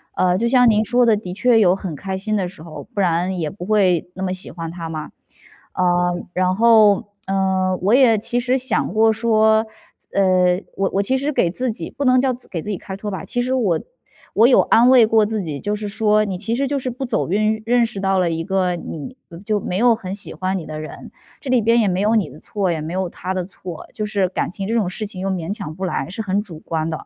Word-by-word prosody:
呃， 180 -1 +2
就 235 +3 0
像 250 -1 +5
您 215 0 +3
说 245 +2 +2
的， 225 -2 +4
的 185 -4 -6
确 235 +2 +3
有 185 -3 +4
很 185 -6 -6
开 190 +4 -4
心 215 +2 -2
的 190 -3 0
时 165 -3 -12
候， 165 -2 -10
不 205 - -4
然 180 +1 +1
也 160 -3 -2
不 180 -2 -8
会 190 -5 +2
那 190 - -5
么 185 -1 -1
喜 185 - -3
欢 165 -1 -6
他 165 -2 -6
嘛。 155 -1 -6 0.6
呃， 175 -1 +2 0.2
然 185 0 +1
后， 220 -2 +5 0.2
嗯， 190 -1 0
我 205 +4 +3
也 245 -4 +5
其 240 +4 -1
实 255 +2 +1
想 260 +1 0
过 220 0 +4
说， 220 -1 +3 0.4
呃， 185 -2 +3 0.2
我 195 0 0
我 200 - +3
其 260 +6 +1
实 285 +3 -1
给 170 - +1
自 250 +5 -2
己 190 -7 -5
不 280 - -4
能 255 -1 +4
叫 260 -1 +1
给 185 -9 -7
自 210 - -7
己 190 - -3
开 190 0 -7
脱 210 0 -5
吧， 190 - -5
其 245 0 -2
实 255 +1 -1
我 200 -11 +1 0.5
我 225 +3 +5
有 260 - +5
安 240 +3 +4
慰 250 -4 +7
过 220 0 +3
自 210 -2 -2
己。 150 -4 -5
就 210 0 -2
是 210 0 -4
说， 215 +1 +2
你 190 -2 -3
其 225 +3 -2
实 275 +1 0
就 280 0 -1
是 255 - -3
不 255 +2 -5
走 220 -8 -1
运， 215 +2 +1
认 240 +1 +3
识 220 -3 -5
到 195 0 +1
了 175 -2 +1
一 165 0 -2
个 185 -2 0
你 165 - -7 0.3
就 215 -2 0
没 180 -1 -3
有 240 +1 +5
很 195 -3 -5
喜 200 - -5
欢 190 0 -2
你 165 - -6
的 155 0 -6
人。 155 - -9 0.3
这 265 - -4
里 245 -3 +4
边 230 +2 +3
也 215 - +2
没 185 +1 0
有 215 +2 +2
你 200 -8 +1
的 150 - -13
错， 195 -4 -2
也 160 -2 -2
没 160 +2 -5
有 190 -1 -1
他 185 +2 -5
的 180 -2 -2
错。 180 -3 -9
就 215 - -4
是 200 -3 +1
感 - - -2
情 195 +2 -5
这 225 - -2
种 210 -6 +1
事 215 +3 -4
情 190 -3 -7
又 195 - -2
勉 185 0 -3
强 195 -8 -6
不 190 +1 -4
来， 180 - -3
是 220 +4 -4
很 200 +1 0
主 175 -7 -10
观 160 0 -3
的、 160 - -3
是 - - -12
很 - - -37
200 Hz, 280 characters per minute, -20 LUFS, 180-225 Hz, 0.6 s, 慰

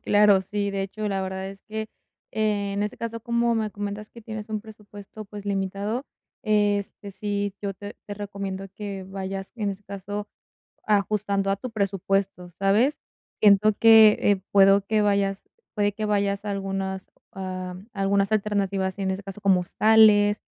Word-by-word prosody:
Claro, 205 -2 +5
sí. 200 +1 -2
De 195 0 -2
hecho, 210 +2 -4
la 195 -1 -1
verdad 190 0 -4
es 195 0 -11
que, 220 0 -5 0.4
en 205 -2 0
ese 210 - -3
caso, 230 0 -5
como 235 +1 +1
me 220 -1 -1
comentas 205 +1 -6
que 235 - -13
tienes 215 -1 -7
un 215 -1 -3
presupuesto, 210 -1 -12
pues, 205 0 -10
limitado, 200 +5 -2 0.4
este, 205 -1 0
sí, 205 -1 -2
yo 200 -1 -3
te 205 +2 -9
te 205 - -5
recomiendo 195 -1 -5
que 200 -2 -6
vayas, 195 0 -6
en 210 -3 -1
ese 195 +1 -8
caso, 200 +1 -6 0.6
ajustando 200 -1 +1
a 195 - +1
tu 250 +5 -7
presupuesto, 195 -3 -1
¿sabes? 215 +9 +2 0.4
Siento 210 0 +6
que, 220 -2 +8
eh, 200 -2 +2
puedo 195 0 +6
que 215 0 +2
vayas 200 -1 +1 0.3
puede 205 -1 +1
que 215 +1 -3
vayas 200 -1 0
algunas 195 -1 -3 0.2
ah, 185 -1 -5 0.2
algunas, 200 0 +1
am, - - +5
alternativas, 200 -2 -1
en 195 -1 -1
ese 190 - -5
caso, 195 +1 -9
como 195 -3 +4
hostales, 210 +2 +4
200 Hz, 160 wpm, -25 LUFS, 195-210 Hz, 0.6 s, que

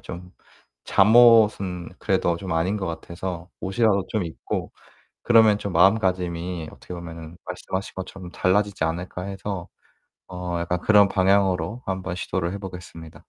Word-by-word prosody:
좀 90 +1 -9 0.5
잠옷은 105 -5 +5
그래도 95 -4 +1
좀 90 +1 -5
아닌 85 +5 0
것 95 -2 -3
같아서 85 +1 -6
옷이라도 100 0 +1
좀 105 -5 -1
입고 80 - -5 0.5
그러면 110 -3 +5
좀 100 -2 -5
마음가짐이 90 -3 +1
어떻게 90 - -10
보면은 85 -1 -9
말씀하신 95 +1 -5
것처럼 95 -1 -8
'달라지지 100 -2 +1
않을까.' 90 +2 -3
해서 95 -2 -5 0.6
어 90 -1 -4
약간 85 +1 -1
그런 105 0 +5
방향으로 95 +2 +1
한번 95 -1 -3
시도를 90 -1 -2
해 100 - -5
보겠습니다. 90 -4 -9
95 Hz, 325 characters per minute, -24 LUFS, 85-100 Hz, 0.6 s, 잠옷은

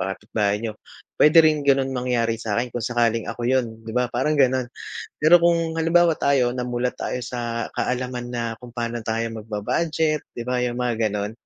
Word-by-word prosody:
kapitbahay 105 -1 -1
niyo, 110 -2 -3 0.5
puwede 150 +2 +6
rin 155 -1 +3
gano'n 135 -1 +3
mangyari 120 -3 0
sa'kin 115 +3 -1
kung 120 - -3
sakaling 115 -2 +1
ako - - -6
'yon, 120 -3 0
'di 115 - -6
ba, 125 0 +1
parang 130 +5 0
gano'n. 130 -1 +3 0.5
Pero 165 +3 +7
kung 165 -1 +2
halimbawa 165 0 +3
tayo, 130 -5 +2
namulat 125 0 -2
tayo - - -3
sa 120 -1 -4
kaalaman 125 -1 -2
na, 120 -1 -2 0.2
kung 120 - -10
paano 120 0 -3
tayo 115 +1 -1
magba-budget, 155 +9 -1
'di 120 - -3
ba, 125 0 0
'yong 120 -1 -1
mga 115 -3 0
gano'n. 105 0 -3
125 Hz, 175 wpm, -23 LUFS, 115-135 Hz, 0.5 s, Pero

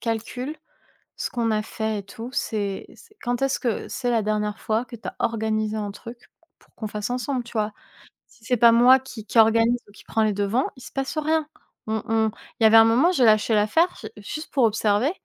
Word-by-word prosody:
calcule 245 +5 -4 0.6
ce - - -3
qu'on 235 -2 -1
a 215 -1 +1
fait 220 0 -3
et - - -11
tout, 225 +4 -9
c'est 205 -7 -2
c'est 425 - -19
quand 245 0 -1
est-ce 270 0 +1
que 235 -4 -2
c'est 245 -2 -2
la 230 -2 +2
dernière 210 -1 -1
fois 220 +2 0
que 235 -1 -10
tu 225 - -8
as - - -6
organisé 220 -1 -1
un 205 -1 -3
truc 230 +4 -10 0.4
pour - - -28
qu'on 220 - -5
fasse 210 +1 -4
ensemble, 250 +1 -2
tu 235 - -13
vois? 215 -2 -1 0.6
Si 230 - -24
c'est 250 - +1
pas 235 +1 +7
moi 245 +3 +6
qui 250 -4 -10
qui 225 - -3
organise 230 +2 +5
ou - - -17
qui 205 - -16
prends 225 - 0
les 215 -1 +1
devants, 205 +6 0
il - - -13
se - - -11
passe 270 +3 -3
rien». 310 0 +1 0.4
On 220 0 -1
on 220 -1 +1 0.3
il - - 0
y - - +7
avait 220 +1 +7
un 225 - +8
moment, 245 +10 +4
j'ai 265 -9 +3
lâché 215 +1 +4
l'affaire 220 +13 +3
j 215 - -6
juste 300 +10 -7
pour 270 - +2
observer, 220 +3 +2
225 Hz, 230 wpm, -24 LUFS, 215-250 Hz, 0.6 s, un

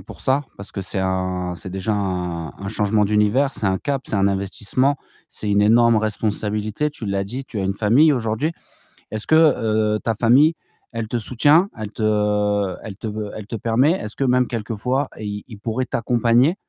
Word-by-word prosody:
pour 90 - -12
ça, 135 +2 +1
parce 100 +1 -10
que 100 - -4
c'est 95 +1 -3
un, 95 -1 -1
c'est 90 +2 -9
déjà 95 +3 -2
un 90 -5 -2
un 100 - -5
changement 105 0 +1
d'univers, 105 +7 +2
c'est 105 - -3
un 95 -1 +2
cap, 140 -2 -2
c'est - - -1
un 100 0 +3
investissement, 100 +8 0 0.3
c'est 105 - -5
une 100 0 +3
énorme 115 +1 +5
responsabilité, 110 +3 -1
tu 145 - -9
l'as 100 0 -1
dit, 125 +7 -6
tu 110 -5 -5
as 95 - -1
une 95 +1 -1
famille 125 +10 +4
aujourd'hui. 115 +7 -1 0.6
Est-ce 110 0 -3
que, 155 - +4
heu, 110 -9 +3
ta 115 -2 -1
famille, 135 +9 +4 0.4
elle 115 -1 -3
te 120 - -2
soutient? 145 - +3
Elle 110 -2 -5
te 105 -3 +1
elle 105 -4 -8
te 110 - -9 0.3
elle 110 - -7
te 115 - -5
permet 115 +7 +2
est-ce 110 - -5
que 140 - -1
même 125 -1 +3
quelques 115 -1 -4
fois, 130 +6 -1
i 105 -1 -5
ils 110 -4 -11
pourraient 115 +4 -2
t'accompagner, 120 - +2
110 Hz, 195 wpm, -21 LUFS, 100-125 Hz, 0.6 s, énorme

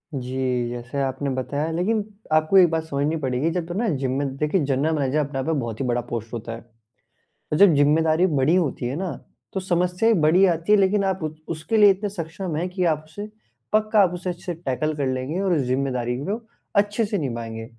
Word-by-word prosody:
जी, 125 -1 -1
जैसे 120 +3 -4
आपने 135 +1 -2
बताया, 140 +4 -2
लेकिन 205 +6 0 0.3
आपको 155 +4 +4
एक 180 -2 +7
बात 160 0 -1
समझनी 150 0 -1
पड़ेगी 130 +4 0
जब 175 0 -2
तो 175 - -5
ना 225 +5 0
जिम 130 -1 -2
में 140 -1 -2
देखिए 150 +5 +1
जनरल 140 +4 +1
मैनेजर 140 0 0
अपने 145 -2 -2
आप 130 - -2
में 160 -2 0
बहुत 115 -3 -5
ही - - -1
बड़ा 120 -1 0
पोस्ट 115 0 -5
होता 115 0 -5
है। 115 - -12 0.9
जब 200 -2 +7
ज़िम्मेदारी 155 +4 +3
बड़ी 150 0 +2
होती 155 -8 0
है 125 +3 -2
ना 185 +1 -3 0.4
तो 190 - -1
समस्याएँ 180 +4 +1
बड़ी 170 +6 +5
आती 170 +1 0
हैं 210 - +6
लेकिन 200 +1 +3
आप 190 -1 0
ऊ 155 - -1 0.2
उसके 165 +8 -2
लिए 210 -1 +8
इतने 200 +2 -2
सक्षम 170 -2 -5
है 170 +4 -1
कि 185 0 -2
आप 155 -2 +1
उसे 205 +7 -7 0.5
पक्का 215 0 +3
आप 180 -3 +3
उसे 180 0 -4
टैकल 155 -1 -2
कर 145 -2 -1
लेंगे 130 +6 -2
और 190 -2 +1
उस 155 - +2
ज़िम्मेदारी 125 -2 -1
को 205 +5 -1 0.4
अच्छे 205 +2 +2
से 205 0 -2
निभाएँगे, 115 -6 -4
155 Hz, 210 wpm, -23 LUFS, 130-185 Hz, 0.9 s, लिए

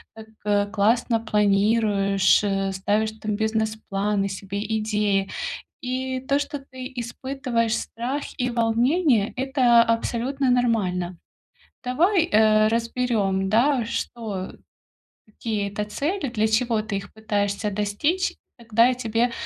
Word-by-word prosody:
так 210 -2 -2
классно 225 +2 +2
планируешь, 205 -2 +3
э, 195 -1 0
ставишь 205 +3 0
там 215 -1 -2
бизнес-планы 210 -2 -1
себе, 195 +1 -5 0.2
идеи. 210 -2 0 0.5
И 260 +1 -2
то, 275 +2 +1
что 290 0 -4
ты 260 -1 -9
испытываешь 235 -1 -2
страх 255 +5 -4 0.2
и 250 -1 0
волнение,- 235 - +2
это 255 -3 +4
абсолютно 240 +4 0
нормально. 195 -8 +1 0.7
Давай, 335 +9 +2
э, 215 0 +5
разберём, 225 -5 0
да, 245 +3 +3
что 220 -4 -4 0.7
какие 215 -1 -3
это 205 +1 -3
цели, 285 - -2
для 220 -2 +1
чего 225 0 +1
ты 215 -2 -4
их 195 +1 -8
пытаешься 205 -1 -1
достичь, 210 - 0 0.2
тогда 230 0 +3
я 255 - +2
тебе 235 0 0
220 Hz, 115 wpm, -24 LUFS, 205-250 Hz, 0.7 s, э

